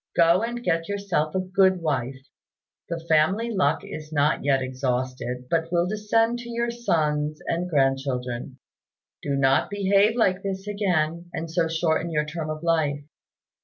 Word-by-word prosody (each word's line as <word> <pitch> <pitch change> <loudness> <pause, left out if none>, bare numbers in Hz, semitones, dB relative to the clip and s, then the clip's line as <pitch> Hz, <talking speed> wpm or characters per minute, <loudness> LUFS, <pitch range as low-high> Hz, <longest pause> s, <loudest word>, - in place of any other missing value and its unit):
Go 170 +2 +5
and 240 +1 -3
get 165 -2 0
yourself 195 -6 -1
a - - +2
good 185 0 +3
wife. 135 -5 -2 0.7
The 165 -1 -4
family 185 +10 +2
luck 170 -8 +1
is 155 0 -8
not 150 0 +1
yet 135 -1 +3
exhausted, 130 -1 -3
but 165 +3 0
will 175 -1 +2
descend 225 +4 +1
to 240 0 -8
your 235 0 -1
sons 150 -10 0
and 175 +2 -2
grandchildren. 135 -3 -1 0.6
Do 140 - -1
not 135 0 +3
behave 205 +2 +3
like 195 -5 +2
this 195 0 -4
again, 175 -5 -1
and 165 0 -4
so 165 0 +1
shorten 160 0 0
your 150 -2 0
term 155 0 -5
of 155 +1 -5
life." 155 -4 +1
165 Hz, 155 wpm, -25 LUFS, 145-195 Hz, 0.7 s, Go